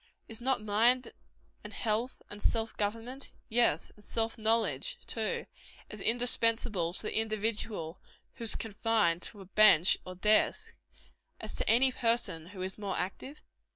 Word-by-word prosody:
Is 225 +1 -3
not 255 -3 0
mind, 235 +5 +3 0.5
and - - -8
health, 230 +3 -2
and 205 0 -9
self 225 0 0
government 230 +6 -4 0.2
yes, 230 -9 +2
and 210 - -20
self 225 +1 -2
knowledge, 230 - 0
too 475 -1 -2 0.5
as - - -8
indispensable 230 -6 +1
to - - -3
the - - -3
individual 215 -5 -2 0.3
who 235 - -8
is 225 - +3
confined 210 -5 0
to 205 +1 -8
a - - -11
bench 190 -3 +5
or 185 - -8
desk, 210 +4 +2 0.6
as - - -7
to - - -2
any 255 +4 +5
person 230 -10 0
who 185 -1 -7
is 190 +2 -5
more 200 -3 -3
active? 265 +10 -5
220 Hz, 150 wpm, -31 LUFS, 200-235 Hz, 0.6 s, bench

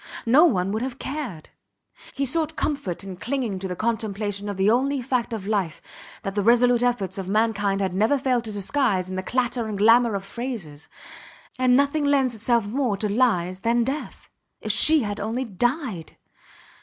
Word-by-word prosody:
No 270 +9 +6
one 195 - +1
would 220 +2 -2
have 255 0 -4
cared. 260 - -6 0.7
He 275 - 0
sought 315 +3 -1
comfort 200 - -3
in 190 -2 -8
clinging 235 -3 -3
to 190 - -4
the 180 - -4
contemplation 210 -2 -2
of 200 - -5
the 195 +1 +2
only 265 +5 +2
fact 250 -1 -1
of 215 -4 -5
life 195 -6 -1 0.4
that 195 - -3
the 205 - 0
resolute 240 +2 +4
efforts 240 -6 -1
of 190 -1 -5
mankind 205 -2 +1
had 190 -2 -1
never 220 +9 +2
failed 255 -3 0
to 220 - -5
disguise 205 -2 0
in 185 - -5
the 185 - -2
clatter 245 +2 -1
and 210 -2 -4
glamour 230 +2 +4
of 195 0 -4
phrases. 195 - -6 0.7
And 255 -1 +4
nothing 285 +2 +1
lends 275 -3 +2
itself 230 0 +1
more 235 -1 -1
to 210 - -1
lies 195 -5 +1
than 235 +3 +1
death. 270 +5 -5 0.3
If - - -2
she 315 -1 +6
had 205 -1 -4
only 230 +5 -2
died! 235 - -3
225 Hz, 180 wpm, -24 LUFS, 195-255 Hz, 0.7 s, No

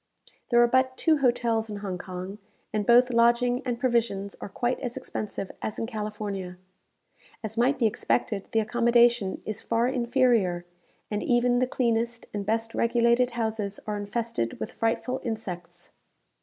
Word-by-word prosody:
There 240 - +4
are - - +5
but 260 +1 +2
two 320 -1 +3
hotels 235 -4 +1
in 210 - -4
Hong 195 -3 -4
Kong, 185 +3 -7 0.3
and 210 -2 -1
both 245 +2 +6
lodging 240 +2 +3
and 245 -2 -2
provisions 230 -6 0
are - - -5
quite 240 +5 -1
as 245 -3 -4
expensive 200 -2 -5
as 215 - -4
in - - -2
California. 210 -5 -5 0.9
As 220 0 -4
might 250 +5 +2
be 245 - +1
expected, 215 -2 0
the 225 - +3
accommodation 235 -2 +3
is 215 0 -4
far 230 +1 +1
inferior; 235 -8 +2 0.5
and 210 - -1
even 245 0 +2
the 255 - +2
cleanest 235 -2 0
and 200 -1 -4
best 225 +1 0
regulated 235 +1 +3
houses 220 -3 -2
are 210 - -2
infested 205 - -3
with 110 - -4
frightful 250 +3 -1
insects. 175 -7 -6
230 Hz, 155 wpm, -27 LUFS, 205-240 Hz, 0.9 s, both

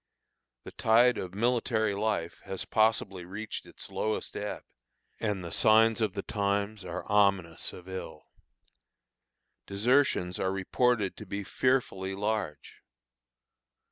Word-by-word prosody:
The - - -9
tide 120 +3 +4
of 90 0 -6
military 115 -2 +1
life 100 -5 -2
has 95 -1 -4
possibly 110 -4 +1
reached 105 +5 -6
its - - -10
lowest 110 0 -2
ebb, 105 0 -4 0.6
and 105 -4 -1
the 85 - -6
signs 110 +1 +5
of 105 -4 +1
the 100 - -4
times 100 0 -1
are 90 -2 -5
ominous 100 -5 +2
of 90 0 -12
ill. 95 -4 -7 1.4
Desertions 100 -4 +2
are 95 - 0
reported 100 +2 +1
to 110 - -9
be 100 +2 -4
fearfully 95 -6 0
large. 105 -7 -3
100 Hz, 120 wpm, -29 LUFS, 95-110 Hz, 1.4 s, signs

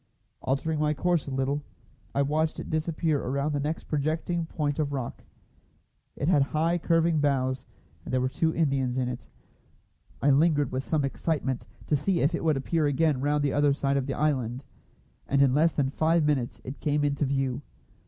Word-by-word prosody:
Altering 145 +4 -1
my 150 0 +1
course 175 +1 +1
a - - -4
little, 135 +2 0 0.5
I 140 - +3
watched 155 +3 0
it - - -6
disappear 155 -1 0
around 140 +3 -1
the 145 - -1
next 150 +3 -2
projecting 160 +3 -1
point 145 -2 -2
of 145 -2 0
rock. 130 -4 -4 0.9
It 140 - -2
had 155 -5 +4
high 160 +5 +1
curving 165 -1 +2
bows, 130 -3 0 0.4
and - - -7
there 130 - +2
were 130 - +1
two 160 +5 0
Indians 135 -6 0
in 130 -1 0
it. 125 -1 -6 0.9
I 145 - +3
lingered 145 -1 +3
with 130 +1 -2
some 150 -2 0
excitement, 135 -2 -2 0.2
to 150 - +2
see 175 +5 +1
if 145 +5 +2
it 170 - -2
would 155 -3 +2
appear 155 +3 +1
again 145 -1 +1
round 145 +1 +1
the 140 - +1
other 145 -1 +3
side 140 0 0
of 135 -1 0
the 135 - -2
island; 130 -4 -1 0.6
and 140 - +2
in 135 -2 +5
less 160 +3 +3
than 135 -2 0
five 160 +2 +2
minutes 135 -5 0
it 130 +3 -7
came 150 0 +1
into 145 0 +1
view. 135 -1 -1
145 Hz, 190 wpm, -27 LUFS, 135-155 Hz, 0.9 s, in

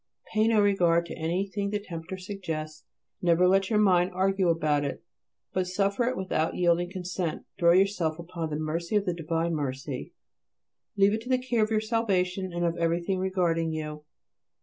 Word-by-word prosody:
Pay 215 0 +3
no 225 -2 +4
regard 175 -4 +3
to 170 - -7
anything 195 +5 -2
the 210 - 0
tempter 180 -2 -7
suggests. 165 -5 -6 0.4
Never 175 +1 +4
let 195 +1 +3
your 220 - +2
mind 185 -4 +4
argue 190 -1 +2
about 155 -3 +1
it; 140 - -4 0.5
but 185 -1 0
suffer 200 +5 +1
it 255 +1 -1
without 175 -4 -1
yielding 175 0 +2
consent. 180 -2 -4
Throw 170 0 +6
yourself 185 -4 +2
upon 170 -1 -5
the 150 - -3
mercy 165 +5 -2
of 205 -1 +2
the 180 - 0
divine 165 0 -1
Mercy. 135 -2 -4 0.8
Leave 200 0 +5
to 230 - -12
it - - -6
the 255 - +4
care 250 -3 0
of 215 - 0
your 215 -1 +1
salvation 195 -5 0
and 175 0 -1
of 170 0 0
everything 170 +3 0
regarding 170 -4 0
you. 150 -1 -5
180 Hz, 175 wpm, -27 LUFS, 165-195 Hz, 0.8 s, Throw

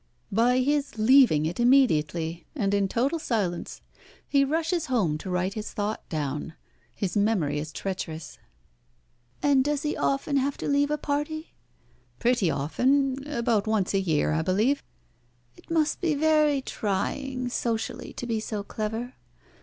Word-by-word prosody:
"By 245 +4 +3
his 285 -2 0
leaving 220 - +5
it 170 +6 -3
immediately, 170 - +2
and 200 -7 0
in 200 -1 +2
total 265 - 0
silence. 200 - -2 0.5
He 280 -1 +3
rushes 325 +3 0
home 190 -13 +1
to 190 - -7
write 180 +2 0
his 215 0 -6
thought 210 +1 -3
down. 150 +1 -3 0.4
His 195 -1 -3
memory 195 -9 +1
is 155 +1 -5
treacherous." 165 -4 -5 1.0
"And 280 -2 +4
does 295 0 -1
he 300 - -1
often 275 +1 0
have 275 +1 0
to - - -4
leave 285 0 +2
a 300 - 0
party?" 300 +2 -3 0.6
"Pretty 240 -7 +2
often. 265 - +1
About 235 -6 0
once 215 -4 +1
a 195 - +3
year, 155 -5 +1
I 160 +1 +1
believe." 210 - +1 0.7
"It - - -20
must 320 -2 +1
be 330 -4 +1
very 300 -2 +3
trying 255 +6 -2
socially 230 -2 -3
to - - -6
be 230 -2 -1
so 215 -1 -4
clever. 225 +4 -4
235 Hz, 145 wpm, -26 LUFS, 190-280 Hz, 1.0 s, leaving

